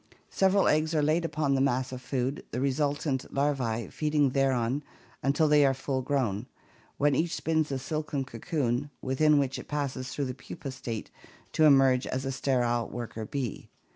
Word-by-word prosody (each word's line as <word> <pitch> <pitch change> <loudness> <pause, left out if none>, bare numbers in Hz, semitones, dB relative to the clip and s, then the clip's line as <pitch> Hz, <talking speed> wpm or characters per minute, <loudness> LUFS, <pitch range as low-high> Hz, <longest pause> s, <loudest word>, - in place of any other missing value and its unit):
Several 195 +1 +3
eggs 155 +1 +2
are 150 - +3
laid 160 +3 +2
upon 150 -3 0
the 135 - +2
mass 130 -1 +1
of 130 -1 -6
food, 130 +2 -2
the 125 - -3
re 135 +1 +2
sultant 145 -1 -1
larvae 130 -5 0
feeding 150 -3 +1
thereon 135 -1 +1 0.4
until 145 +3 +2
they 150 -1 +5
are 135 -1 +3
full 135 0 -2
grown, 125 -5 -1 0.5
when 145 0 +3
each 160 +5 0
spins 160 -2 0
a 135 - 0
silken 150 0 -3
cocoon 140 -3 -2
within 150 +3 +3
which 135 -2 0
it - - -10
passes 135 -3 -3
through 140 +2 -2
the 130 - -3
pupa 135 +1 -8
state 120 -4 -6 0.4
to 155 - +4
emerge 135 -3 +5
as 130 +1 -3
a 135 - -1
sterile 120 -3 0
worker 115 -2 -5
bee. 130 -4 -4
135 Hz, 175 wpm, -29 LUFS, 130-150 Hz, 0.5 s, they